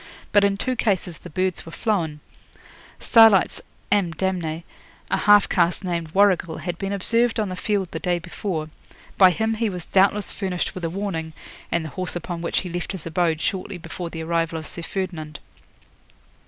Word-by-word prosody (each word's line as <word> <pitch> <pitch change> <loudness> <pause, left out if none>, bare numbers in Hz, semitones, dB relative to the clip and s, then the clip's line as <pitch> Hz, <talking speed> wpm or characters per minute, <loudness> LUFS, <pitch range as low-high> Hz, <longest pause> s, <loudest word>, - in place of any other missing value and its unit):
But 205 - +5
in 200 0 +2
two 255 +5 -1
cases 185 -8 -1
the 180 - -10
birds 185 +2 -1
were 165 - -10
flown. 165 -8 -1 0.8
Starlight's 225 -5 +5 0.3
"ame 190 -5 +2
damnee", 170 -3 -2 0.5
a - - +3
half 205 -1 +6
caste 175 +1 +1
named 170 -3 -2
Warrigal, 185 -4 +3
had 175 -1 -5
been 195 0 -3
observed 230 +4 +2
on 210 -3 0
the 185 - -4
field 195 -1 -1
the 160 - -4
day 175 +1 0
before. 170 -2 -4 0.5
By 190 -2 +9
him 220 +5 0
he 225 0 0
was 180 -3 -6
doubtless 200 +2 +2
furnished 185 -3 -2
with 185 - -7
a 165 - 0
warning, 165 -4 -4 0.4
and 170 -2 0
the - - -5
horse 185 +3 -3
upon 175 0 -4
which 170 - 0
he 180 - -6
left 175 +3 -4
his 185 -5 -7
abode 165 -1 0
shortly 190 0 -2
before 170 +1 -6
the 165 -1 -6
arrival 165 0 0
of 160 - -6
Sir 170 - -6
Ferdinand. 165 -4 -4
180 Hz, 180 wpm, -23 LUFS, 165-200 Hz, 0.8 s, By